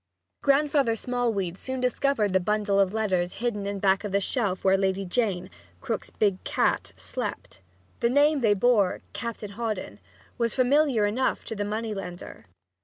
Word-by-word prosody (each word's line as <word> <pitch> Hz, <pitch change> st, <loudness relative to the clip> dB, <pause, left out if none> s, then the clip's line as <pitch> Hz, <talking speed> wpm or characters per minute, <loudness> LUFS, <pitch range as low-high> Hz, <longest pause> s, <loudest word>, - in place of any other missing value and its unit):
Grandfather 280 Hz, -4 st, +3 dB
Smallweed 225 Hz, -7 st, -2 dB
soon 260 Hz, 0 st, -4 dB
discovered 250 Hz, -4 st, +1 dB
the 190 Hz, -, +4 dB
bundle 205 Hz, +1 st, +1 dB
of 195 Hz, -2 st, +3 dB
letters 190 Hz, -5 st, 0 dB
hidden 205 Hz, -3 st, -2 dB
back 195 Hz, 0 st, +2 dB
of 205 Hz, -, -4 dB
the 200 Hz, -, +2 dB
shelf 200 Hz, -3 st, -1 dB
where 190 Hz, 0 st, +5 dB
Lady 195 Hz, 0 st, 0 dB
Jane, 185 Hz, -2 st, 0 dB, 0.3 s
Krook's 235 Hz, -5 st, -3 dB
big 200 Hz, -3 st, 0 dB
cat, -, -, 0 dB
slept. -, -, -5 dB, 0.4 s
The 235 Hz, -, +2 dB
name 290 Hz, +3 st, +4 dB
they 215 Hz, -5 st, +3 dB
bore, 205 Hz, -3 st, +2 dB
"Captain 230 Hz, -3 st, -5 dB
Hawdon," 205 Hz, -, -4 dB, 0.4 s
was 230 Hz, -2 st, +1 dB
familiar 260 Hz, -3 st, +3 dB
enough 245 Hz, +6 st, 0 dB
to 225 Hz, -, -5 dB
the 205 Hz, -, -2 dB
money 215 Hz, +1 st, -3 dB
lender. 180 Hz, -, -8 dB
210 Hz, 155 wpm, -26 LUFS, 195-245 Hz, 0.4 s, where